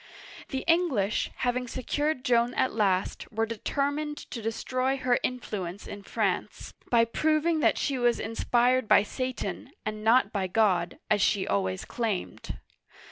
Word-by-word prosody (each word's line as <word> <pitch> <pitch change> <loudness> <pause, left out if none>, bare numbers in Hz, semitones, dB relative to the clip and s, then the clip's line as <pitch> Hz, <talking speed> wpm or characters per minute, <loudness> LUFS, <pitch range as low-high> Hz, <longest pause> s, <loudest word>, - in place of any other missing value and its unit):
The 265 -2 -3
English, 325 - +2
having 250 0 -1
secured 280 +3 -2
Joan 240 0 +2
at 260 - +1
last, 195 -2 0
were 225 +1 0
deter 275 +6 -1
mined 295 0 -4
to 235 - -5
destroy 255 +4 -1
her 250 -2 +2
influence 205 -7 -4
in 205 - -8
France, - - -2 0.2
by 230 -1 +5
proving 310 +6 +1
that - - +3
she 270 -2 -1
was 240 -1 +2
inspired 240 +2 +1
by 205 - +6
Satan 255 +3 -4 0.2
and 215 0 -4
not 225 -1 +4
by 195 -3 0
God, 185 -4 +2
as 210 -2 +4
she 195 0 +2
always 95 -2 -1
claimed. 220 -6 -3
235 Hz, 145 wpm, -28 LUFS, 210-260 Hz, 0.2 s, by